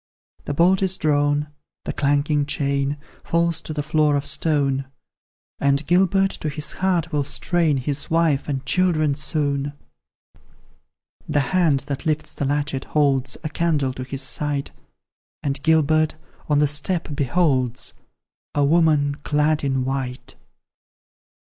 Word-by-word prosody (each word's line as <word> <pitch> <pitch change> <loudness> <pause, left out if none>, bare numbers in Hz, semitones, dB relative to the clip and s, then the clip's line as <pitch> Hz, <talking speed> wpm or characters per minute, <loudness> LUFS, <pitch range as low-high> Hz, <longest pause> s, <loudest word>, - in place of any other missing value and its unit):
The 145 - -3
bolt 180 +5 +4
is 190 -1 0
drawn, 145 -2 +1 0.4
the - - -3
clanking 145 0 +1
chain 140 0 -1 0.3
Falls 170 -1 +1
to - - -7
the 150 -1 -2
floor 150 0 +2
of 140 - -1
stone; 140 -4 0 0.7
And 140 +1 +1
Gilbert 195 +3 +3
to 155 - -1
his 150 +1 0
heart 175 -3 0
will 145 -2 +1
strain 165 +1 +1
His 140 +2 -3
wife 160 -4 +1
and 135 -2 -3
children 160 -5 +2
soon. 145 -1 -1 1.6
The 145 - +2
hand 165 -7 +3
that 140 +3 -5
lifts 155 -1 -1
the 145 - -3
latchet, 145 -1 -1
holds 135 -3 +1
A 155 - -2
candle 150 -5 0
to 130 - -7
his 135 +1 -5
sight, 145 0 -2 0.7
And 140 -1 -2
Gilbert, 155 0 +3 0.3
on 145 - +3
the 150 0 +4
step, 155 +5 -1
beholds 130 -4 0 0.6
A 145 -1 +3
woman, 150 -2 +3
clad 150 0 +1
in 135 -2 0
white. 130 -1 -4
145 Hz, 135 wpm, -22 LUFS, 140-160 Hz, 1.6 s, bolt